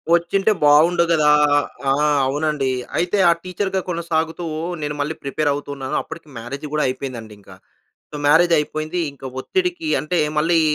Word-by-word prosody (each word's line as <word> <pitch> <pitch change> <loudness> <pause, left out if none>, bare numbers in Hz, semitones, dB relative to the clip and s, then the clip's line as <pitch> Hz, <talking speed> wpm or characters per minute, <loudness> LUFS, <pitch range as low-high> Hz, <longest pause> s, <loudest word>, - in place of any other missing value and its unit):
వచ్చింటే 195 +5 +1
బావుండు 155 +4 +5
కదా. 155 -2 +4 0.6
ఆ! - - +4 0.3
అవునండి 145 -1 -1 0.3
అయితే 180 +4 0
ఆ - - +7
టీచర్‌గా 190 +1 -2
కొనసాగుతూ 165 0 -2 0.4
నేను 150 0 -3
మళ్ళీ 150 +2 -2
ప్రిపేర్ 145 +2 -1
అవుతున్నాను. 140 -2 -5
అప్పటికి 165 - -10
మ్యారేజ్ 135 +6 -7
గూడా 150 - +1
అయిపోయిందండి 120 -5 -5
ఇంక. 100 - -21 0.6
సో 150 - -7
మ్యారేజ్ 165 +3 +5
అయిపోయింది. 155 +3 -2
ఇంకా 135 -1 -10
ఒత్తిడికి 355 - -2
అంటే 170 +4 0 0.2
మళ్ళీ 165 +2 +3
155 Hz, 140 wpm, -20 LUFS, 145-175 Hz, 0.6 s, ఆ